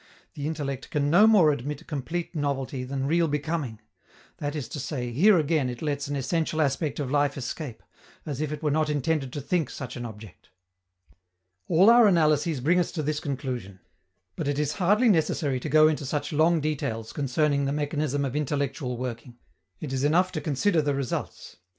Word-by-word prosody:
The 145 Hz, 0 st, -4 dB
intellect 140 Hz, -4 st, -4 dB
can 145 Hz, -1 st, 0 dB
no 200 Hz, +6 st, +7 dB
more 190 Hz, -9 st, +6 dB
admit 140 Hz, +1 st, -4 dB
complete 165 Hz, +6 st, -4 dB
novelty 140 Hz, -2 st, -2 dB
than 135 Hz, +1 st, -3 dB
real 165 Hz, +3 st, +2 dB
becoming; 145 Hz, -6 st, -3 dB, 0.6 s
that 145 Hz, 0 st, -3 dB
is 145 Hz, -4 st, -4 dB
to 150 Hz, -, -5 dB
say, 125 Hz, -3 st, -4 dB
here 185 Hz, -, +5 dB
again 155 Hz, -4 st, +1 dB
it 125 Hz, +2 st, -6 dB
lets 145 Hz, -2 st, -2 dB
an 145 Hz, -, -3 dB
essential 160 Hz, +3 st, -1 dB
aspect 150 Hz, 0 st, 0 dB
of 135 Hz, -3 st, -3 dB
life 145 Hz, -1 st, +1 dB
escape, 130 Hz, 0 st, -6 dB, 0.4 s
as 145 Hz, -2 st, -4 dB
if 155 Hz, -1 st, -2 dB
it 150 Hz, +1 st, -6 dB
were 150 Hz, -, +1 dB
not 155 Hz, +1 st, +1 dB
intended 145 Hz, -2 st, -1 dB
to 145 Hz, -, -4 dB
think 160 Hz, 0 st, 0 dB
such 130 Hz, -, -7 dB
an 120 Hz, -, -5 dB
object. 110 Hz, -4 st, -11 dB, 1.2 s
All 175 Hz, +4 st, +5 dB
our 235 Hz, -2 st, +7 dB
analyses 155 Hz, -5 st, +2 dB
bring 170 Hz, +7 st, +3 dB
us 175 Hz, -, 0 dB
to 155 Hz, -, -2 dB
this 150 Hz, +1 st, -1 dB
conclusion. 125 Hz, -9 st, -5 dB, 0.6 s
But 150 Hz, -, -3 dB
it 145 Hz, -1 st, 0 dB
is 150 Hz, 0 st, 0 dB
hardly 210 Hz, +7 st, +4 dB
necessary 155 Hz, -, +1 dB
to 150 Hz, -, -5 dB
go 155 Hz, +1 st, +6 dB
into 155 Hz, -1 st, -1 dB
such 145 Hz, +2 st, -2 dB
long 160 Hz, +2 st, +3 dB
details 115 Hz, -7 st, -3 dB
concerning 140 Hz, +1 st, +1 dB
the 135 Hz, -, 0 dB
mechanism 145 Hz, -1 st, -1 dB
of 135 Hz, 0 st, -4 dB
intellectual 140 Hz, -3 st, -2 dB
working; 120 Hz, 0 st, -6 dB, 0.4 s
it 140 Hz, -3 st, -5 dB
is 135 Hz, 0 st, -1 dB
enough 175 Hz, +5 st, +3 dB
to 155 Hz, -, -4 dB
consider 155 Hz, +4 st, +1 dB
the 145 Hz, -1 st, 0 dB
results. 135 Hz, -8 st, -4 dB
145 Hz, 185 wpm, -26 LUFS, 135-155 Hz, 1.2 s, no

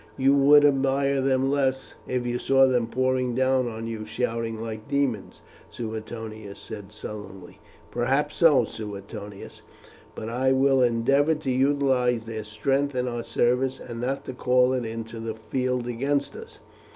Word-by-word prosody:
"You 135 Hz, +1 st, +4 dB
would 145 Hz, +1 st, +6 dB
admire 135 Hz, 0 st, +2 dB
them 135 Hz, 0 st, +1 dB
less 135 Hz, -2 st, 0 dB
if 125 Hz, -1 st, -1 dB
you 120 Hz, 0 st, -1 dB
saw 135 Hz, 0 st, +4 dB
them 125 Hz, -3 st, +1 dB
pouring 130 Hz, 0 st, 0 dB
down 130 Hz, -1 st, +2 dB
on 115 Hz, -1 st, -5 dB
you 115 Hz, -1 st, -5 dB
shouting 115 Hz, 0 st, -3 dB
like 110 Hz, -1 st, -6 dB
demons," 140 Hz, -7 st, -1 dB, 0.3 s
Suetonius 110 Hz, -2 st, -7 dB
said 105 Hz, -2 st, -9 dB
sullenly. 105 Hz, -3 st, -9 dB, 0.3 s
"Perhaps 140 Hz, +5 st, 0 dB
so, 160 Hz, -5 st, +5 dB
Suetonius; 105 Hz, -1 st, -8 dB, 0.5 s
but 110 Hz, -, -6 dB
I 130 Hz, +3 st, +1 dB
will 135 Hz, 0 st, +3 dB
endeavour 135 Hz, +6 st, +3 dB
to 150 Hz, -3 st, -3 dB
utilize 130 Hz, -3 st, +2 dB
their 110 Hz, -1 st, -5 dB
strength 135 Hz, +6 st, -1 dB
in 125 Hz, 0 st, 0 dB
our 120 Hz, -1 st, -3 dB
service, 125 Hz, +3 st, +1 dB
and 120 Hz, -1 st, -7 dB
not 135 Hz, +3 st, -2 dB
to 130 Hz, -, -5 dB
call 125 Hz, 0 st, +3 dB
it 125 Hz, -2 st, -1 dB
into 115 Hz, 0 st, -6 dB
the 115 Hz, -1 st, -4 dB
field 125 Hz, +2 st, -2 dB
against 140 Hz, +4 st, -1 dB
us. 455 Hz, +1 st, -11 dB
125 Hz, 150 wpm, -25 LUFS, 115-135 Hz, 0.5 s, would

